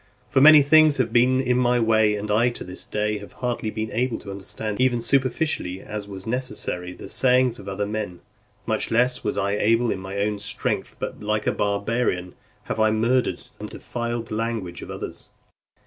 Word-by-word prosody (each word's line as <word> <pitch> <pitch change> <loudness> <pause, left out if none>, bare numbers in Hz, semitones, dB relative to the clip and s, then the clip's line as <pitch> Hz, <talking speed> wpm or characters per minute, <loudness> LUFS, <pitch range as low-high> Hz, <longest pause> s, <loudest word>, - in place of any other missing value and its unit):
For 135 - +3
many 150 0 +9
things 155 0 +6
have 115 -3 0
been 125 +2 +4
in 125 -1 +1
my 125 -1 +3
way, 110 -2 +3
and 105 0 -4
I, 115 +4 +3
to 120 - -6
this 90 0 -7
day, 105 0 -2
have 100 - -12
hardly 120 -3 -3
been 110 0 -4
able 125 0 0
to 100 - -9
understand, 100 +3 -4
even 125 -2 +3
superficially, 130 - 0
as 105 0 -6
was 95 -2 -8
necessary, 110 -7 -2
the - - -10
sayings 125 -2 +3
of 100 - -11
other 100 +1 -2
men; 105 -4 -4 0.4
much - - -1
less 125 +2 +2
was - - -2
I 100 +1 0
able 115 +3 +2
in - - -3
my 95 +1 -6
own 105 0 -1
strength, 100 - -3
but - - -6
like 105 0 -1
a - - +2
barbarian, 100 -3 -1 0.3
have - - -4
I 110 0 +4
murdered 115 +4 +1 0.2
and - - -6
defiled 120 -1 -4
the - - -3
language 110 -6 -3
of - - -9
others. - - -7
110 Hz, 195 wpm, -23 LUFS, 100-125 Hz, 0.4 s, many